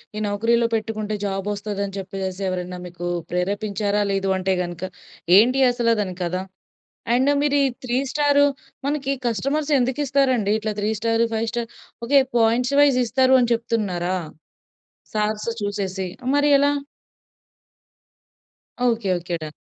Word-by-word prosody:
ఈ - - -3
నౌకరీలో 230 +3 +2
పెట్టుకుంటే 215 -1 -3
జాబ్ 195 0 -2
వస్తదని 200 -1 -4
చెప్పేసి 190 0 -5
ఎవరైనా 180 0 -3
మీకు 175 0 -6 0.2
ప్రేరేపించారా? 205 +3 -1
లేదు 195 0 0
అంటే 190 0 0
కనుక 175 0 -7 0.5
ఏంటి 255 +5 +4
అసలు 235 -1 +2
దాని 185 -3 -2
కథ? 175 +1 -2 0.8
అండ్ 260 +3 +3
మీరు 285 -1 +2
ఈ - - +4 0.2
3 250 +1 0
స్టారు, 285 -1 +3 0.4
మనకి 280 -1 -1
కస్టమర్స్ 275 +7 -1
ఎందుకు 255 +3 0
ఇస్తారండి 255 -6 +2
ఇట్లా 215 0 -2
3 210 +1 0
star, 230 0 +2
5 225 +1 -1
star? 235 -1 -3 0.4
Okay, 275 +3 +5 0.2
points 240 +4 +2
vice 280 -3 +5
ఇస్తారని 255 0 +3
చెప్తున్నారా 200 -6 -1 1.0
స్టార్స్ 215 +1 -1
చూసేసి? 195 -2 -3 0.3
మరి 290 0 +3
ఎలా? 285 0 +3 2.1
Okay 225 -4 0
okay. 175 0 -4
డన్. 155 -1 -6
215 Hz, 130 wpm, -22 LUFS, 195-250 Hz, 2.1 s, Okay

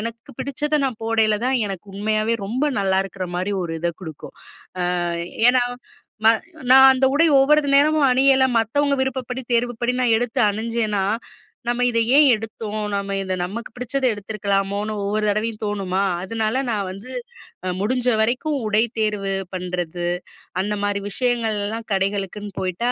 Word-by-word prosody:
எனக்கு 230 +5 -7
பிடிச்சத 295 +2 -1
நான் 245 -5 -3
போடையில 220 -2 +2
தான் 265 - +2
எனக்கு 195 0 -6
உண்மையாகவே 215 +2 0
ரொம்ப 250 +7 -1
நல்லா 190 -1 +2
இருக்கிற 190 -1 -5
மாரி 185 +3 -1
ஒரு 165 -1 -4
இதை 170 +1 0
குடுக்கும். 160 -4 -9 0.7
அ - - -1 0.4
ஏன்னா, 250 -1 +3 1.1
நான் 265 0 +9
அந்த 260 0 +2
உடை 330 +3 +5
ஒவ்வொரு 295 +1 +4
நேரமும் 295 -1 +4
அணியலை 265 0 +4
மத்தவங்க 280 +6 +1
விருப்பப்படி 260 -1 -4
தேர்வுப்படி 240 0 +1
நான் 235 -3 +4
எடுத்து 245 +2 -2
அணிஞ்சேனா, 220 -2 -1 0.6
"நம்ம 245 +1 +1
இதை 230 0 +2 0.2
ஏன் 295 -1 +7
எடுத்தோம்? 215 -1 -5
நம்ம 200 0 -2
இதை 190 -1 -2
நமக்கு 215 +7 -5
பிடிச்சத 255 +2 -3
எடுத்துருக்கலாமோன்னு" 205 0 -2
ஒவ்வொரு 210 +2 0
தடவையும் 215 +1 -1
தோணுமா, 195 -2 -1 0.2
அதனால 225 +5 -1
நான் 200 -3 -1
வந்து 200 +7 -10 0.7
முடிஞ்ச 250 +4 0
வரைக்கும் 265 +6 0
உடை 215 +2 +3 0.2
தேர்வு 205 -2 0 0.2
பண்ணுறது, 180 -1 -3 0.5
அந்த 210 +2 -2
மாதிரி 200 0 -1
விஷயங்கள்லாம் 225 -2 -1
கடைகளுக்குன்னு 195 +1 -2
போய்ட்டா 190 +7 -1
220 Hz, 140 wpm, -22 LUFS, 200-250 Hz, 1.1 s, நான்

